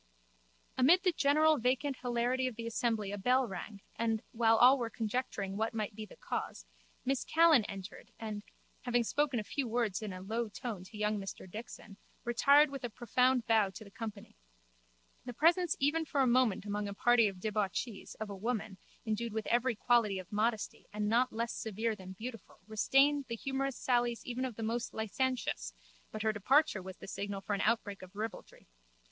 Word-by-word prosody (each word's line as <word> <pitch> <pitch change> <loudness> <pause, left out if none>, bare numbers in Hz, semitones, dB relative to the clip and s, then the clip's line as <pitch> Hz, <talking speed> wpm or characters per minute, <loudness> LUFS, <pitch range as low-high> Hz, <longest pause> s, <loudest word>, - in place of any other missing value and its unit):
Amid 335 +9 +6
the 365 - +4
general 305 0 +4
vacant 255 +3 0
hilarity 245 +1 0
of 250 - -5
the 230 0 -6
assembly 225 -3 -1
a 205 - -4
bell 255 +4 +3
rang 200 +1 -7
and, 225 -1 0
while 225 -1 +4
all 260 +3 +7
were 235 -2 -2
conjecturing 215 -3 -3
what 225 +1 -1
might 215 -1 -2
be 215 +1 -7
the - - -14
cause, - - -5 0.4
Miss 270 0 0
Callan 320 -8 +5
entered 195 0 -8
and, 215 -2 -4 0.4
having 245 -2 +1
spoken 280 +1 0
a - - -3
few 270 +4 -2
words 225 -4 0
in 215 -2 -4
a 185 - -7
low 220 +4 -2
tone 210 -2 -5
to 210 +3 -11
young 210 0 0
Mr 195 -1 -7
Dixon, 210 0 -9 0.3
retired 280 +5 +5
with 275 -2 -6
a 245 - -2
profound 250 +2 +2
bow 220 -4 +3
to 205 +3 -10
the 200 - -14
company. 215 -2 -7 0.9
The 245 -2 -6
presence 335 +4 +3
even 315 +4 +2
for 285 -2 0
a - - +4
moment 240 -5 +3
among 205 0 -2
a 200 - -5
party 240 0 +4
of 195 -2 -5
debauchees 210 +1 -2
of 215 -2 -6
a - - -5
woman 215 -2 -3 0.3
endued 220 +1 -2
with 220 -1 -2
every 245 +1 +2
quality 220 -2 +2
of 185 -2 -8
modesty 215 +1 -1
and 210 0 -2
not 245 +3 +3
less 230 +1 -2
severe 220 +1 -2
than 190 -2 -9
beautiful 230 +3 -8
refrained 270 +7 +3
the 230 - -2
humourous 270 +2 -2
sallies 240 -2 0
even 250 +1 -2
of 250 -4 -5
the 225 - -5
most 230 +2 -2
licentious 220 - -2 0.4
but 215 - -4
her 220 -1 +2
departure 260 +2 +3
was 185 0 -9
the - - -11
signal 200 0 -4
for 205 - -3
an 200 - 0
outbreak 215 -3 0
of 185 +1 -12
ribaldry. 220 +1 -6
230 Hz, 190 wpm, -33 LUFS, 210-255 Hz, 0.9 s, all